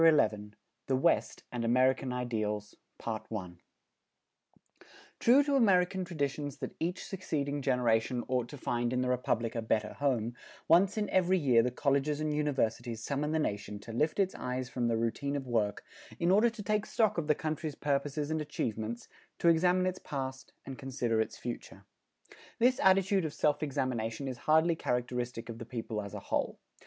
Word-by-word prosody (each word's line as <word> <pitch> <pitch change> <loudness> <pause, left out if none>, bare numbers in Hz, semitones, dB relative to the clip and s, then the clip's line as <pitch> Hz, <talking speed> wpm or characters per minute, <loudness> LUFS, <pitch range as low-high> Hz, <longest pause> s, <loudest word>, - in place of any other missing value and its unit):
XI 105 -10 +4 0.4
THE 130 - +2
WEST 150 +6 +1
AND 120 -1 -3
AMERICAN 130 +3 +3
IDEALS[290:1] 110 -4 -4 1.6
True 260 +5 +6
to 285 0 +1
American 190 -6 +3
traditions 145 -4 -3
that - - -5
each 175 +3 -2
succeeding 145 -7 -2
generation 125 -2 +1
ought 125 -2 0
to 145 - -8
find 120 -1 -1
in 125 - +1
the 130 - 0
Republic 120 -2 0
a 115 - -2
better 110 -1 0
home, 120 -5 0 0.3
once 185 +5 +5
in 210 -1 0
every 185 0 +3
year 130 -8 +4
the 125 - +1
colleges 140 +3 +1
and 155 0 -1
universities 120 -6 -1
summon 145 +2 -1
the 160 - +1
nation 105 -7 -2
to 105 +3 -9
lift 155 +7 +1
its 190 -1 +2
eyes 125 0 -3
from 120 -1 -1
the 115 -1 +1
routine 130 +5 -1
of 140 -2 -3
work, 110 -4 0 0.4
in 170 +1 +3
order 215 +5 +5
to 225 -2 -8
take 210 +1 0
stock 215 -6 +2
of 155 - -3
the 150 - +4
country's 155 -1 -3
purposes 145 +1 -1
and 160 0 0
achievements, 115 -5 -3 0.3
to 170 - +4
examine 180 +2 +4
its 185 0 -1
past 130 -2 -5
and 135 -1 -7
consider 125 -5 0
its 110 - -4
future. 120 -1 -7 0.7
This 255 +3 +3
attitude 190 0 +4
of 155 -2 -4
self 150 0 +2
examination 130 -3 -2
is 125 -2 -5
hardly 160 +2 +5
characteristic 125 -3 -2
of 115 -1 -7
the 115 - -6
people 115 -3 -4
as 100 -2 -7
a - - -4
whole. - - -1
135 Hz, 170 wpm, -31 LUFS, 120-160 Hz, 1.6 s, True